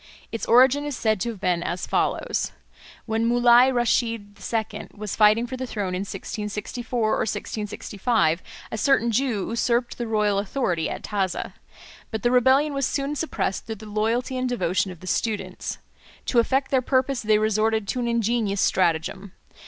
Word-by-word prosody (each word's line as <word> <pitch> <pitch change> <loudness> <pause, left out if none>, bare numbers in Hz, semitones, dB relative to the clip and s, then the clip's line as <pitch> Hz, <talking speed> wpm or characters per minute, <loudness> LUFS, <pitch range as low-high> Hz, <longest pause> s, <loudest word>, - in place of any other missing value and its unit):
Its 225 - -4
origin 260 +4 +5
is 290 -4 -4
said 215 -3 +1
to 235 - 0
have 220 -4 -7
been 180 -3 +1
as 175 +1 -3
follows. - - -1 0.5
When 225 0 0
Mulai 240 +1 +6
Rasheed 230 -4 0 0.2
II. 220 -2 -2
was 210 -1 -5
fighting 215 +2 +5
for 260 - -5
the 260 0 -4
throne 200 -5 -3
in 180 - -1
1664 210 +5 -5
or - - +2
1665, 210 -4 -1 0.3
a - - -3
certain 235 -2 +3
Jew 230 -4 0
usurped 235 +1 0
the 240 - -2
royal 210 -2 +1
authority 195 -6 -1
at - - -6
Taza. 195 -4 -2 0.6
But 220 -2 -4
the 240 - +3
rebellion 265 +4 +4
was 275 -2 0
soon 280 +1 -2
suppressed 295 -10 -2
through 220 - -4
the 215 +1 -12
loyalty 225 +5 -1
and 255 0 -1
devotion 190 -5 0
of 180 -3 -10
the - - -10
students. 195 -2 -2 0.5
To 240 - +3
effect 265 +4 +1
their 265 -2 +3
purpose 260 0 +1
they 215 -1 +3
resorted 215 0 +1
to 255 - -1
an 240 - -1
ingenious 230 -3 0
stratagem. 180 +2 0
225 Hz, 170 wpm, -24 LUFS, 205-245 Hz, 0.6 s, Mulai